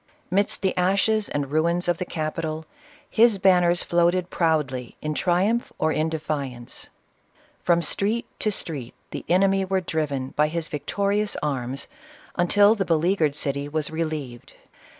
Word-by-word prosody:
Midst 200 +2 +1
the 190 - +1
ashes 200 +4 +2
and 140 -1 -2
ruins 170 +3 +1
of 175 -1 +1
the 180 - -2
capital, 155 0 -3 0.4
his 230 -2 +4
banners 180 -2 +4
floated 175 +1 +2
proudly 145 -7 0
in 155 0 -3
triumph 190 +9 +1
or 160 - +1
in 155 +1 0
defiance. 140 -6 -4 0.7
From 170 -1 +2
street 210 +8 +1
to 215 - 0
street 145 - -4 0.2
the - - -5
enemy 195 +2 +3
were 190 0 0
driven 150 -7 -2
by 150 +2 +2
his 165 0 -2
victorious 200 +8 -1
arms, 135 -2 -2 0.5
until 205 +4 +5
the 205 -4 -1
beleaguered 165 -3 +2
city 140 -1 -1
was 155 0 -2
relieved. 155 -7 -4
165 Hz, 140 wpm, -24 LUFS, 150-190 Hz, 0.7 s, until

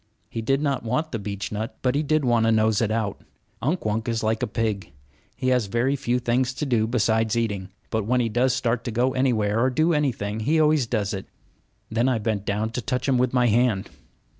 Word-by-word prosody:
He 115 - -4
did 135 +5 +1
not 140 -3 0
want 130 +8 -1
the 115 - -3
beechnut; 105 +2 -4
but 125 -1 +2
he 145 - +1
did 155 -1 +1
want 115 -2 +3
to - - +4
nose 110 -1 +3
it 110 - +1
out. 110 -2 -2 0.4
Unk 150 +7 -1
Wunk 110 +2 -1
is 115 -1 -1
like 110 0 0
a - - 0
pig. 105 -5 -2 0.4
He 130 - -1
has 125 -5 +2
very 120 +6 +1
few 125 -3 0
things 125 +1 0
to 150 - -2
do 115 -5 +1
besides 110 -1 +1
eating; 100 -5 -2 0.2
but 110 -2 0
when 125 +3 +2
he 120 - +1
does 120 +4 +2
start 120 -2 0
to 120 - -2
go 125 +4 +1
anywhere 115 -5 +1
or 130 +3 +3
do 155 +6 +2
anything 115 -8 -1
he 150 +9 +2
always 150 -5 +3
does 105 -3 -1
it. 95 -1 -5 0.6
Then 115 +4 +2
I 125 - +1
bent 105 -2 -2
down 105 +2 -1
to 125 - -3
touch 125 +4 -2
him 130 -2 +3
with 125 -1 +2
my 125 -1 +3
hand. 115 -3 +2
115 Hz, 225 wpm, -24 LUFS, 110-130 Hz, 0.6 s, to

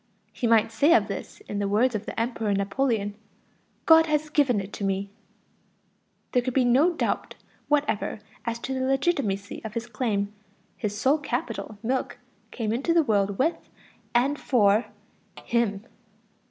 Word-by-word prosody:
He 240 - -1
might 225 -1 +4
say 285 +9 +4
of - - +3
this - - -7
in 205 - -5
the 200 - 0
words 230 +5 +2
of 215 0 -4
the - - -4
Emperor 225 -2 -1
Napoleon: 205 +1 0 0.7
"God 325 0 +7
has 305 0 0
given 270 -8 +3
it 195 +1 -7
to - - -5
me." 195 0 -1 1.2
There 250 - +3
can 250 0 -3
be 260 -2 +4
no 275 +9 +4
doubt - - -2 0.3
whatever 290 -8 0 0.2
as 235 -1 -2
to 265 - -3
the 260 - -2
legitimacy 260 - 0
of 220 0 -7
his 230 0 -2
claim; 210 -3 -2 0.4
his 205 -1 -3
sole 270 +8 +3
capital, 240 -5 -4
milk, 255 +3 -1 0.3
came 220 -3 -2
into 280 +8 0
the 335 - +5
world 200 -5 +1
with 320 +6 0 0.5
and 275 +4 +2
for 215 -3 +3 0.6
him. 225 -3 0
235 Hz, 155 wpm, -26 LUFS, 205-270 Hz, 1.2 s, God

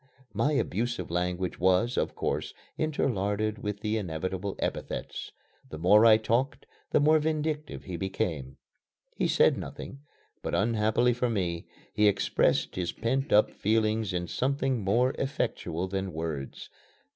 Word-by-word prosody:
My 150 - +1
abusive 120 - -1
language 90 +1 -1
was, 95 +7 +3
of - - -1
course, - - -2 0.2
interlarded 110 -8 0
with 105 0 -4
the 110 +1 0
inevitable 95 +1 -3
epithets. - - -4 0.4
The 80 - -7
more 105 +7 +6
I 110 -1 +8
talked, 120 +4 0 0.2
the - - +3
more 155 +2 +5
vindictive 155 0 -2
he 90 -2 -5
became. 80 -7 -3 0.6
He - - +1
said - - +4
nothing, 135 - -7 0.4
but, - - -2
unhappily 110 +3 +2
for 125 +1 0
me, 90 -6 -2 0.3
he 105 0 +4
expressed 100 -1 +2
his 90 -2 -1
pent 130 +5 -1
up 105 - +5
feelings 110 0 +1
in 90 -1 -2
something 135 +1 0
more 120 +7 +2
effectual 105 - -2
than 95 -1 -3
words. 80 -4 -5
105 Hz, 135 wpm, -28 LUFS, 90-125 Hz, 0.6 s, I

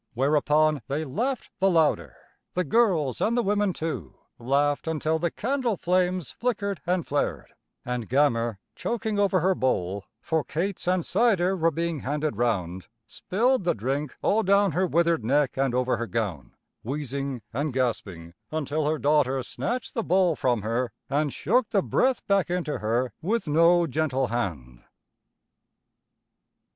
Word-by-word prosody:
Whereupon 150 +2 +2
they 150 +3 -2
laughed 235 - -2
the 195 - +4
louder, 165 -4 +2 0.4
the 180 - 0
girls 165 - +2
and 235 +2 +2
the 240 - +2
women 205 -1 +1
too 145 - -5 0.2
laughed 140 +5 +1
until 160 0 0
the 170 +1 0
candle 245 - -1
flames 180 -2 0
flickered 205 -5 -2
and 180 -2 +1
flared, 90 - -2 0.3
and 125 -2 -3
Gammer, 120 -5 +2 0.2
choking 220 -3 -2
over 195 -3 +3
her 190 +3 +3
bowl, 100 - -1
for 160 -2 -1
cates 175 +6 -3
and 180 -2 +1
cider 195 -3 +2
were 165 -2 +2
being 165 0 -2
handed 145 0 -2
round, 95 -6 -1 0.2
spilled 225 - 0
the 175 - +1
drink 135 +6 -2
all 220 - +3
down 200 -1 +3
her 185 +4 +1
withered 170 -4 +2
neck 140 +3 +1
and 135 -2 0
over 125 -1 +1
her 115 +1 -3
gown, 95 - -3 0.3
wheezing 135 -1 -4
and 145 +5 -1
gasping 100 -10 -2 0.2
until 155 -1 -1
her 155 - 0
daughter 140 -3 +2
snatched 240 - -4
the 230 - -1
bowl 180 -3 +3
from 120 -7 0
her 115 +2 -1 0.2
and 145 +1 +1
shook 235 - +1
the 195 -3 +2
breath 260 -1 +1
back 200 -3 +2
into 170 -7 -2
her 115 +4 0
with 215 +4 -1
no 170 +3 +4
gentle 135 -3 0
hand. 75 - -4
155 Hz, 150 wpm, -26 LUFS, 125-185 Hz, 0.4 s, the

